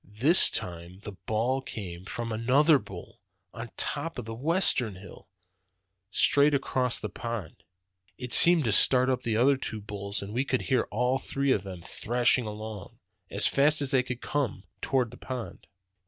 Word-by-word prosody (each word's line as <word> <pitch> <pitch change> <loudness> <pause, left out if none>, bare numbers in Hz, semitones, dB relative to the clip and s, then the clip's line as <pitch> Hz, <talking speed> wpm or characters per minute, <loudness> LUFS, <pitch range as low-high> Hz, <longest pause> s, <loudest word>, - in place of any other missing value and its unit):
"This 155 +9 +6
time 85 +2 -6
the 105 - -7
bawl 115 +7 -2
came 95 -8 -8
from 115 +2 -5
another 135 +7 +3
bull, 95 -7 -12 0.3
on 115 0 -8
top 155 +2 -1
of 120 - -6
the 115 - -7
western 130 - +3
hill, 95 +2 -14 0.8
straight 145 +8 +3
across 130 -2 0
the - - -5
pond. 115 -8 -7 0.6
It 125 -2 -5
seemed 170 -2 +7
to 110 - +1
start 130 +5 +4
up 125 -1 -2
the 115 -3 -2
other 135 +4 +3
two 110 -4 -6
bulls, 100 0 -3
and 100 +1 -8
we 125 +3 0
could 135 -2 -2
hear 130 - 0
all 125 +4 0
three 140 0 -2
of 105 - +1
them 90 -3 -10
thrashing 120 +2 0
along, 110 +1 -8 0.3
as 100 - +2
fast 150 +3 +3
as 140 -2 -1
they 135 -2 +3
could 125 -1 -7
come, 135 -9 -3 0.2
towards 125 -4 -1
the - - -12
pond. 125 -8 -8
120 Hz, 170 wpm, -27 LUFS, 105-135 Hz, 0.8 s, seemed